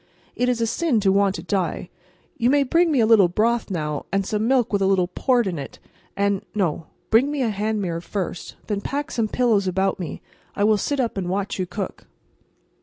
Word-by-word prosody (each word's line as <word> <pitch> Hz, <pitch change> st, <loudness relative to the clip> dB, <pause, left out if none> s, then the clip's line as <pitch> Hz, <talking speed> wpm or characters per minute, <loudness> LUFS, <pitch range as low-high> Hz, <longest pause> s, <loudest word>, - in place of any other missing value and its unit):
It 250 Hz, 0 st, +1 dB
is 245 Hz, -2 st, 0 dB
a -, -, +3 dB
sin 270 Hz, 0 st, +1 dB
to 195 Hz, -1 st, +3 dB
want 195 Hz, 0 st, +2 dB
to -, -, -6 dB
die. 180 Hz, -2 st, -2 dB, 0.4 s
You 235 Hz, -, +1 dB
may 285 Hz, +1 st, +4 dB
bring 335 Hz, +5 st, +2 dB
me 270 Hz, -5 st, +3 dB
a -, -, +4 dB
little 220 Hz, -4 st, +6 dB
broth 225 Hz, +6 st, 0 dB
now, 150 Hz, -5 st, -3 dB
and 195 Hz, 0 st, 0 dB
some 215 Hz, +2 st, -1 dB
milk 250 Hz, -4 st, +2 dB
with 200 Hz, -, +2 dB
a 190 Hz, -, +3 dB
little 190 Hz, -2 st, +2 dB
port 245 Hz, +5 st, +1 dB
in 175 Hz, -5 st, -3 dB
it, 140 Hz, -, -8 dB, 0.4 s
and—no; 200 Hz, -4 st, -1 dB, 0.2 s
bring 240 Hz, +6 st, +5 dB
me 290 Hz, -2 st, -1 dB
a 230 Hz, -, +1 dB
hand 210 Hz, +1 st, -1 dB
mirror 170 Hz, -2 st, -3 dB
first, 180 Hz, -1 st, -5 dB
and -, -, -31 dB
then 205 Hz, -2 st, -2 dB
pack 285 Hz, +6 st, -3 dB
some 225 Hz, -2 st, 0 dB
pillows 215 Hz, -4 st, +1 dB
about 190 Hz, +2 st, 0 dB
me, 170 Hz, -4 st, -4 dB
and -, -, -8 dB, 0.4 s
I 205 Hz, -, 0 dB
will 215 Hz, 0 st, +4 dB
sit 285 Hz, +5 st, -1 dB
up 235 Hz, -5 st, -1 dB
and 180 Hz, -2 st, -2 dB
watch 195 Hz, +1 st, -2 dB
you 185 Hz, -, -1 dB
cook." 195 Hz, +1 st, -6 dB
205 Hz, 225 wpm, -23 LUFS, 190-235 Hz, 0.4 s, little